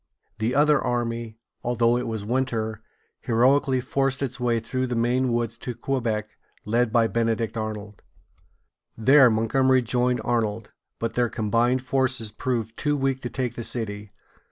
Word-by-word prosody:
The 115 +3 0
other 150 +1 +4
army, 115 -2 -2 0.2
although 120 0 +2
it 125 0 -2
was 110 -3 -3
winter, 115 -3 -1 0.4
heroically 130 +3 +2
forced 135 +1 0
its 130 -1 -4
way 120 -2 +1
through 130 +3 -2
the 125 - -2
Maine 120 +2 +1
woods 115 -1 -1
to 125 - -5
Quebec, 115 -4 -2 0.4
led 115 +1 +1
by 115 -1 +4
Benedict 115 0 0
Arnold. 105 -2 -5 1.0
There 130 +3 +6
Montgomery 130 +4 +2
joined 125 +1 0
Arnold; 115 -2 -1 0.3
but 115 - -3
their 120 -1 +1
combined 120 +3 +1
forces 130 -4 0
proved 115 -1 -3
too 145 -1 0
weak 135 -1 0
to 120 - -4
take 125 -2 -3
the 120 - -6
city. 105 -3 -4
120 Hz, 150 wpm, -25 LUFS, 115-130 Hz, 1.0 s, There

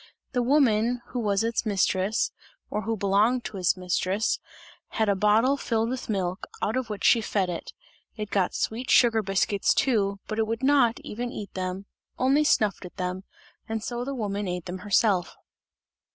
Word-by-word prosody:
The 250 - +1
woman 245 -3 +3
who 250 - -3
was 205 -2 +1
its 230 0 0
mistress, 200 0 +1 0.4
or 210 - -1
who 225 +1 -2
belonged 210 +5 +2
to 205 - -5
its 185 0 +2
mistress, 185 +3 0 0.5
had 220 -1 -1
a 200 - +3
bottle 220 +7 +3
filled 230 -3 0
with 255 -2 -5
milk, 190 -2 -2
out 215 - -1
of 255 -3 -2
which 205 -3 -5
she 230 - +5
fed 195 -4 0
it; 170 - -6 0.4
it 210 -2 -5
got 190 -3 +1
sweet 240 +4 -2
sugar 230 -3 +5
biscuits 195 0 +1
too, 200 -6 +1
but 215 0 -3
it 220 - +1
would 225 +3 -3
not 270 -3 +4
even 245 -4 -5
eat 205 -2 -7
them; 185 +1 -4 0.3
only 275 +4 +3
snuffed 215 -10 +2
at 180 - -11
them, 185 +1 -3 0.4
and 220 -1 -3
so 240 0 -3
the 275 +2 -4
woman 205 -3 -2
ate 180 -1 -4
them 185 +1 -5
herself. 195 -2 +1
215 Hz, 180 wpm, -26 LUFS, 195-240 Hz, 0.5 s, she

